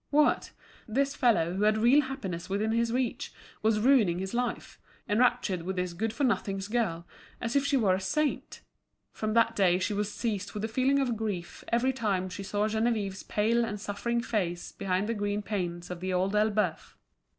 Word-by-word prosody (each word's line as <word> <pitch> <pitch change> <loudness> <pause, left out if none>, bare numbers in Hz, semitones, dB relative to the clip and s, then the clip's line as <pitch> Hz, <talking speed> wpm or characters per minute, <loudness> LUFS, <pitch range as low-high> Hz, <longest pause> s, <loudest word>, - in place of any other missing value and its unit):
What! 300 +1 +3 0.4
this 275 +5 0
fellow, 175 - +2
who 190 - -2
had 215 +1 +4
real 240 +7 +5
happiness 195 -11 -5
within 210 +3 0
his 230 0 +1
reach, 250 -1 -1 0.3
was 215 0 +2
ruining 220 -8 +4
his 190 +3 -4
life, 245 0 -3 0.3
enraptured 230 -4 +2
with 190 +3 -4
this 180 -1 -2
good 220 +6 -2
for 285 - -3
nothings 195 -6 0
girl 205 -7 -1 0.3
as 230 +2 -3
if 280 - +4
she 280 -1 +3
were 205 -7 +3
a 185 - 0
saint! 295 +9 -1 0.5
From 215 0 -3
that 230 0 +4
day 180 -4 +4
she 190 +3 -1
was 205 0 -1
seized 205 -4 -3
with 210 - -3
a - - -1
feeling 260 +4 +2
of 260 -4 +1
grief 205 -6 -4
every 245 +3 +2
time 200 -7 -1
she 190 - -6
saw 205 +2 0
Geneviève's 220 -3 -1
pale 230 +3 +1
and 210 -2 -3
suffering 235 +4 -2
face 180 -8 -2
behind 190 +1 -1
the 230 - 0
green 205 -1 -2
panes 175 -4 -3
of 180 - -5
The 185 +1 -2
Old 190 +3 +1
Elbeuf. 210 0 0
215 Hz, 190 wpm, -29 LUFS, 190-235 Hz, 0.5 s, real